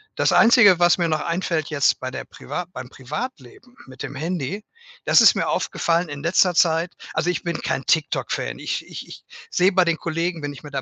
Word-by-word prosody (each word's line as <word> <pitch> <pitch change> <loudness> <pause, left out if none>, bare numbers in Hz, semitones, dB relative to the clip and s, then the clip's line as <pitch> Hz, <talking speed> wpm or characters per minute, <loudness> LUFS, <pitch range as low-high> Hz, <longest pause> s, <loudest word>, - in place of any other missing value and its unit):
Das - - +2
Einzige, 220 -6 +6
was 175 0 +4
mir 170 -2 0
noch 155 -1 0
einfällt 170 -2 -2
jetzt 145 -3 +1
bei 130 - -4
der 130 - -6
priva 180 - -6
beim 125 -1 -8
Privatleben 150 - -8
mit 130 -1 -13
dem - - -6
Handy, 165 +5 -4 0.4
das - - +6
ist - - +7
mir - - -1
aufgefallen 170 0 0
in 145 0 -7
letzter 175 +1 +3
Zeit. 165 +1 +2 0.2
Also, 175 - 0
ich 180 - -2
bin 170 -2 -3
kein 135 - -2
TikTok 160 -2 0
Fan. - - -3
Ich - - -4
ich - - -9
ich - - -12 0.3
sehe 185 +2 +3
bei 185 -2 +3
den 170 -1 +1
Kollegen, 170 0 -3
wenn 145 0 -4
ich 140 - -13
mit 145 - -11
der 135 - -2
165 Hz, 215 wpm, -22 LUFS, 145-180 Hz, 0.4 s, ist